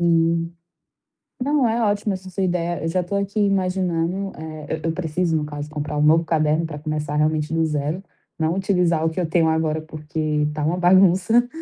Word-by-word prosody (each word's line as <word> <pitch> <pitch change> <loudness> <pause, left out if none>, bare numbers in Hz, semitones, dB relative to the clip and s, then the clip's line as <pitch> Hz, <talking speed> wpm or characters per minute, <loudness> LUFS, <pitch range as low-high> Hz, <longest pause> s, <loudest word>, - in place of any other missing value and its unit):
Hum. 165 0 +2 0.9
Não, 280 -2 +2
é 230 +1 0
ótima 205 -1 +1
essa 185 0 -7
sua 195 +1 -2
ideia, 175 -2 -1
eu - - -1
já 180 +2 +1
estou 200 +3 -2
aqui 200 +2 -2
imaginando, 185 -1 0
eh, 155 -1 -5
eu 160 - -8
eu 165 - +1
preciso 165 0 -1
no 155 - 0
caso 145 0 -6
comprar 150 0 -4
um - - +1
novo 160 +2 +5
caderno 155 0 +1
pra 150 - -7
começar, 150 -1 -3
realmente, 155 0 +1
no 165 0 +2
zero, 150 +4 -2 0.3
não 160 0 +1
utilizar 180 -4 +1
o 165 - +2
que 160 +3 -5
eu 175 - +1
tenho 165 0 +2
agora, 160 -1 0
porque 155 -1 -2
tá 150 0 -3
uma 165 +4 0
bagunça. 190 +6 +4
165 Hz, 195 wpm, -22 LUFS, 155-185 Hz, 0.9 s, novo